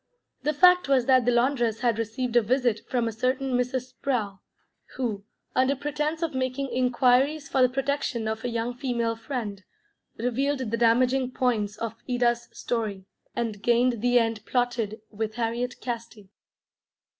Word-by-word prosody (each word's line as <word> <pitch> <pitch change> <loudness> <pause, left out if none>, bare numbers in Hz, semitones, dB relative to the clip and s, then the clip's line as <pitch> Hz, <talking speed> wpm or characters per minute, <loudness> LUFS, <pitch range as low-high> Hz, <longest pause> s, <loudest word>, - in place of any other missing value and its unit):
The 300 0 0
fact 360 -2 +6
was 260 -3 +4
that 255 -2 +4
the 245 - +4
laundress 240 -2 +1
had 235 -3 +1
received 230 +2 -2
a 240 - +7
visit 240 -1 +1
from 245 -3 +1
a - - -1
certain 255 +4 -1
Mrs. 250 +1 -1
Sprowl, 230 -7 -2 0.6
who, 215 -6 -3 0.3
under 260 +2 +3
pretence 295 +3 -2
of 325 - -1
making 260 +1 -2
inquiries 255 +4 +2
for 270 - +1
the 255 - +6
protection 270 -3 -1
of 220 0 -3
a 245 - -1
young 235 +1 -2
female 240 -3 -1
friend, 225 -5 -5 0.5
revealed 255 +1 -1
the - - +2
damaging 250 +3 +3
points 220 -5 0
of 225 0 -3 0.2
Ida's 240 -1 +1
story, 210 -5 -3 0.3
and 225 -4 -3
gained 240 +1 +2
the 245 +1 +4
end 225 -2 +1
plotted 240 -4 -1
with 215 0 -3
Harriet 240 +1 -2
Casti. 230 -5 -6
245 Hz, 155 wpm, -26 LUFS, 230-260 Hz, 0.6 s, a